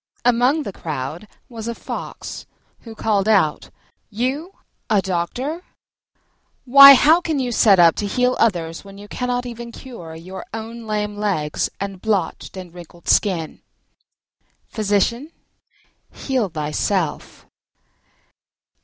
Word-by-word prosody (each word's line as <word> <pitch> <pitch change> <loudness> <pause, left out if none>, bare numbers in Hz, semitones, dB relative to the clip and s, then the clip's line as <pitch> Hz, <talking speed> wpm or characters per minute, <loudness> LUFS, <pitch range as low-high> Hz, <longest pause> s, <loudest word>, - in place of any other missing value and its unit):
Among 250 +6 +3
the 200 - -6
crowd 155 +5 -6 0.2
was 230 -2 -8
a 235 - -3
Fox, - - -7 0.3
who 225 -2 -11
called 210 -2 0
out, 195 -9 +2 0.4
"You 260 - -3 0.4
a 210 -3 +4
doctor! 215 - -3 1.0
Why, 275 +2 +10
how 315 +6 +5
can 320 -3 -2
you 255 -2 -1
set 210 -4 +5
up 170 -2 +6
to 205 - -2
heal 250 +4 +1
others 170 -7 0
when 195 0 -13
you 205 +1 -11
cannot 245 +2 -2
even 235 -1 -7
cure 205 -12 -10
your 185 +4 -9
own 225 +1 -8
lame 210 -1 -2
legs 185 -8 -1
and 195 -2 -5
blotched 205 -2 -2
and 180 -2 -9
wrinkled 175 -1 -14
skin?" 175 -7 +1 1.1
Physician, 225 - -1 0.8
heal 255 -7 -2
thyself. 155 +2 -2
210 Hz, 120 wpm, -20 LUFS, 180-245 Hz, 1.1 s, Why